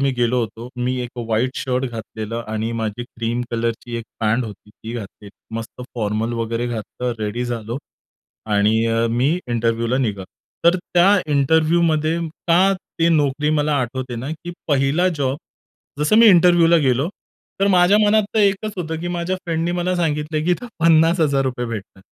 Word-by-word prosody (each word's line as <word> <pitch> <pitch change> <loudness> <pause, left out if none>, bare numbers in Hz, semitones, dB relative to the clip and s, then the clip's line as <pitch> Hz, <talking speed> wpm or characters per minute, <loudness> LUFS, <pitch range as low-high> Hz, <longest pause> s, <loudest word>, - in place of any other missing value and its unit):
मी 140 0 +2
गेलो 120 +1 +2
होतो. 115 +2 -5
मी 125 +1 -1
एक 120 - -6
अ, - - -1
व्हाईट 115 +3 +1
शर्ट 130 0 -1
घातलेलं 110 0 -5
आणि 110 +1 -2
माझी 110 +2 -3
क्रीम 120 0 -3
कलरची 115 0 -2
एक 115 - -5 0.2
पॅन्ट 115 +3 +1
होती 105 -1 -10
ती 110 +2 -9
घातलेली. 105 -2 -8 0.3
मस्त 115 +2 -7
फॉर्मल 110 0 -1
वगैरे 115 +1 -2
घातलं 120 +1 -4
रेडी 110 +3 -2
झालो 120 +1 -4 0.8
आणि 110 +2 +3
अ, 115 0 +1
मी 130 +9 +1
इंटरव्ह्यूला 115 +1 0
निघालो. 105 -7 -1 0.4
तर 170 +2 +6 0.2
त्या 175 +2 +6 0.3
इंटरव्ह्यूमध्ये 160 +2 +2 0.3
का 185 +4 +5 0.3
ती 165 0 +3
नोकरी 150 -2 +2
मला 150 0 +1
आठवते 130 0 -4
ना, 125 +4 -5
की 170 +2 -8 0.2
पहिला 145 +6 +2
जॉब, 135 -1 0 0.6
जसं 150 +8 +3
मी 230 - +8
इंटरव्ह्यूला 175 -3 +6
गेलो, 130 +6 +2 0.5
तर 195 - +4
माझ्या 185 +2 +5
मनात 215 +1 +4
तर - - +2
एकच 200 +1 +1
होतं 160 -3 -4
की 175 - -3
माझ्या 175 +1 -2
फ्रेंडनी 165 0 -1
मला 180 +1 0
सांगितलंय, 155 -2 -1
की 175 - +1
इथं 180 +8 -1
₹50,000 155 -6 +3
भेटतात. 100 -4 -7
130 Hz, 160 wpm, -20 LUFS, 115-165 Hz, 0.8 s, मी